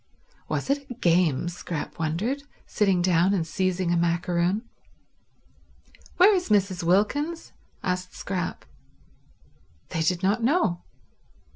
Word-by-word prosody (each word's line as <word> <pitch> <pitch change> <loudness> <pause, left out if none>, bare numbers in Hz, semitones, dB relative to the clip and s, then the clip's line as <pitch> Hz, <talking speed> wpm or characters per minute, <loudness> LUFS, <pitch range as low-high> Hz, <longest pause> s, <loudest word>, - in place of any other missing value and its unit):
Was - - -1
it 280 0 -2
a 250 - -6
game? 170 - +2
Scrap 170 -2 -5
wondered, 185 - -1 0.2
sitting 195 -4 +1
down 180 +2 +3
and 170 -4 0
seizing 185 +1 -1
a 175 - +2
macaroon. 175 +5 0 1.5
"Where 385 +4 +7
is 360 -7 -1
Mrs. 195 -3 +2
Wilkins?" 235 - 0 0.3
asked 180 0 -2
Scrap. 180 -2 -4 1.2
They 160 - -2
did 175 +3 0
not 205 +5 +2
know. 230 - +1
185 Hz, 115 wpm, -25 LUFS, 170-220 Hz, 1.5 s, Where